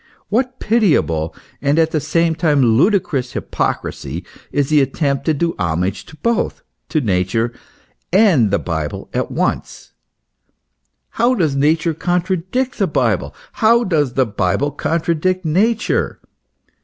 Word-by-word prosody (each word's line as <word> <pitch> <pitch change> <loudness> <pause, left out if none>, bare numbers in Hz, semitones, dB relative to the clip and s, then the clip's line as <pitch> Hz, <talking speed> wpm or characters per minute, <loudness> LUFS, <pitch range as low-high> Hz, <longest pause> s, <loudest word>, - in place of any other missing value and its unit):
What 250 +4 0
pitiable 150 - +1 0.3
and 140 +2 +1
at 160 -1 +3
the 155 - +1
same 165 +3 +1
time 150 -4 +2
ludicrous 140 - +1
hypocrisy 85 +7 -3 0.3
is 145 -1 0
the 150 -2 +4
attempt 140 +1 -1
to 160 - +2
do 165 +3 0
homage 90 +2 -1
to 160 - -13
both, 235 +3 -1 0.3
to 155 - +1
Nature 115 +1 0 0.6
and 180 - +4
the 100 - +2
Bible 80 -3 -4
at - - -1
once! - - -3 1.2
How 240 +2 +2
does 155 - +1
Nature 155 +3 +2
contradict 185 - -1
the - - +2
Bible! - - 0 0.2
How 235 +1 +3
does 150 - 0
the 130 - +3
Bible 110 +6 0
contradict 170 +4 -1
Nature 215 +9 +1
155 Hz, 130 wpm, -18 LUFS, 130-185 Hz, 1.2 s, the